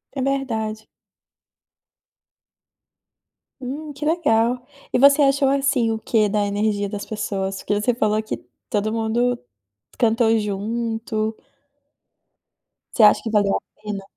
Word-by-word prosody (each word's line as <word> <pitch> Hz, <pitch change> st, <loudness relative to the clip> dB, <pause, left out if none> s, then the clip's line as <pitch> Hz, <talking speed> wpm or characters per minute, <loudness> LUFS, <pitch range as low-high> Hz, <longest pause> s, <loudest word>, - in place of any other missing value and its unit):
É 270 Hz, -, -2 dB
verdade. 225 Hz, -6 st, -2 dB, 2.8 s
Hum, 290 Hz, +4 st, -6 dB
que 285 Hz, +2 st, -6 dB
legal! 245 Hz, -7 st, +1 dB, 0.3 s
E -, -, +2 dB
você 280 Hz, +3 st, +6 dB
achou 275 Hz, 0 st, +3 dB
assim, 270 Hz, -4 st, +2 dB
o 220 Hz, -, -2 dB
quê 220 Hz, -1 st, +2 dB
da 205 Hz, 0 st, 0 dB
energia 205 Hz, 0 st, 0 dB
das 205 Hz, 0 st, -5 dB
pessoas? 195 Hz, -3 st, -3 dB
Porque 205 Hz, -, -1 dB
você 240 Hz, +4 st, +1 dB
falou 215 Hz, -2 st, +1 dB
que 215 Hz, -, -4 dB, 0.3 s
todo 210 Hz, +1 st, 0 dB
mundo 230 Hz, +2 st, 0 dB, 0.6 s
cantou 225 Hz, -1 st, +3 dB
junto 220 Hz, +1 st, -2 dB, 1.6 s
Você -, -, +3 dB
acha 210 Hz, -, +6 dB
que 225 Hz, -, -3 dB
valeu 205 Hz, -2 st, +2 dB
a -, -, -2 dB, 0.2 s
pena? 210 Hz, -2 st, -5 dB
225 Hz, 125 wpm, -22 LUFS, 210-250 Hz, 2.8 s, você